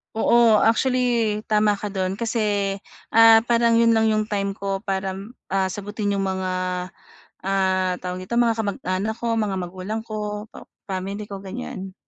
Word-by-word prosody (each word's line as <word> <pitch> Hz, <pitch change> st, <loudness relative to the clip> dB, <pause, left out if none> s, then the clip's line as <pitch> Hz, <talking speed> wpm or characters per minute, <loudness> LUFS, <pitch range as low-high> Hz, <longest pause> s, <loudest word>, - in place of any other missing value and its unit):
Oo, 225 Hz, -1 st, +5 dB
actually 235 Hz, -2 st, +2 dB
tama 210 Hz, -1 st, +3 dB
ka 210 Hz, -, -4 dB
doon 190 Hz, 0 st, -3 dB
kasi, 210 Hz, -4 st, 0 dB, 0.4 s
ah, 225 Hz, 0 st, +8 dB
parang 235 Hz, -1 st, +3 dB
'yon 230 Hz, -1 st, +4 dB
lang 220 Hz, 0 st, +3 dB
yung 215 Hz, 0 st, 0 dB
time 200 Hz, -2 st, -1 dB
ko 195 Hz, 0 st, -4 dB
para, 190 Hz, -2 st, -2 dB, 0.3 s
ah, 190 Hz, -1 st, 0 dB
sagutin 205 Hz, +1 st, -3 dB
'yong 200 Hz, -, 0 dB
mga, 190 Hz, -1 st, -2 dB, 1.0 s
ah, 190 Hz, -1 st, +1 dB
tawag 180 Hz, 0 st, -4 dB
dito 210 Hz, +6 st, -4 dB
mga 230 Hz, -1 st, +2 dB
kamag-anak 200 Hz, 0 st, -2 dB
ko, 235 Hz, +1 st, -5 dB
mga 205 Hz, -3 st, -1 dB
magulang 185 Hz, +4 st, -4 dB
ko, 210 Hz, -1 st, -5 dB
pa -, -, -12 dB, 0.2 s
family 195 Hz, +2 st, -4 dB
ko 195 Hz, -, -5 dB
ganiyan. 190 Hz, -, -7 dB
205 Hz, 155 wpm, -23 LUFS, 190-225 Hz, 1.0 s, ah